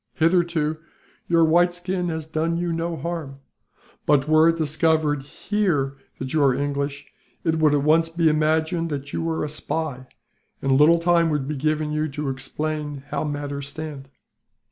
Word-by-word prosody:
Hitherto 165 -2 +1 0.5
your 165 -1 +4
white 175 +2 +3
skin 180 0 -2
has 160 -1 -3
done 160 +2 -1
you 175 -1 -1
no 165 0 -2
harm 155 -3 -5 0.7
but, 145 -1 +3
were 155 +1 +5
it 165 - +1
discovered 155 -1 +1
here 145 -3 -1 0.2
that 130 0 -5
you 155 - +2
are 135 -2 +4
English, 140 0 -3 0.3
it 160 -1 +1
would 155 -2 +4
at 140 - +1
once 165 +2 +4
be 165 0 +1
imagined 160 +2 +1
that 140 -1 -5
you - - -1
were 165 -1 -1
a - - -1
spy, 150 -3 -4 0.5
and 135 - -1
little 150 +5 +6
time 170 0 +3
would 145 -3 -1
be 150 - -2
given 155 +2 0
you 155 +1 0
to 145 0 -3
explain 145 +2 -4
how - - -2
matters 145 -1 -4
stand." 145 -3 -7
155 Hz, 165 wpm, -23 LUFS, 145-165 Hz, 0.7 s, little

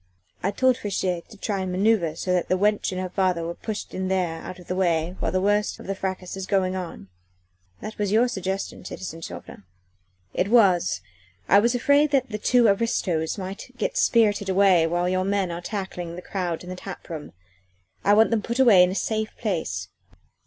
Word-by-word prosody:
I 190 - +1
told 255 +5 +2
Friche 205 -2 -3
to 180 +3 -3
try 200 -2 -2
and 185 -1 -3
manoeuvre 185 -4 +2
so 180 +2 -1
that 180 -1 0
the 185 - +3
wench 210 +1 +1
and 185 - -3
her 185 - -2
father 180 -3 0
are 170 - -3
pushed 210 +3 -6
in 185 0 -2
there 180 -4 -1
out 185 - -8
of 180 - -13
the 180 - -3
way 175 -2 +1
while - - -1
the 185 - +1
worst 205 +2 +1
of - - -10
the 195 - -2
fracas 190 -1 -4
is 190 -1 -5
going 190 -2 +1
on. 175 - -6 0.7
That 215 - -7
was 205 -2 0
your 230 +4 +4
suggestion, 190 -4 -4
citizen 165 -3 -7
Chauvelin." 160 - -9 0.7
"It 185 - 0
was. 200 -6 +4 0.5
I 200 - +6
was 235 +4 +2
afraid 285 +4 +4
the 250 -7 0
two 245 +2 +4
aristos 195 -6 0
might 190 0 -7
get - - -2
spirited 210 - +3
away 190 -3 +4
while 175 +2 0
your 185 0 +1
men 195 -1 0
were 170 0 -5
tackling 180 -3 -5
the 180 - -8
crowd 180 -4 -3
in 180 - -8
the - - -5
tap 195 +1 -9
room. 155 -3 -7 0.7
I 205 - +5
wanted 220 +2 +5
them 225 -2 +2
put 235 +3 -3
away 230 -8 +7
in 180 - +5
a 185 - -3
safe 215 +3 -1
place." 160 - -2
190 Hz, 200 wpm, -24 LUFS, 180-210 Hz, 0.7 s, away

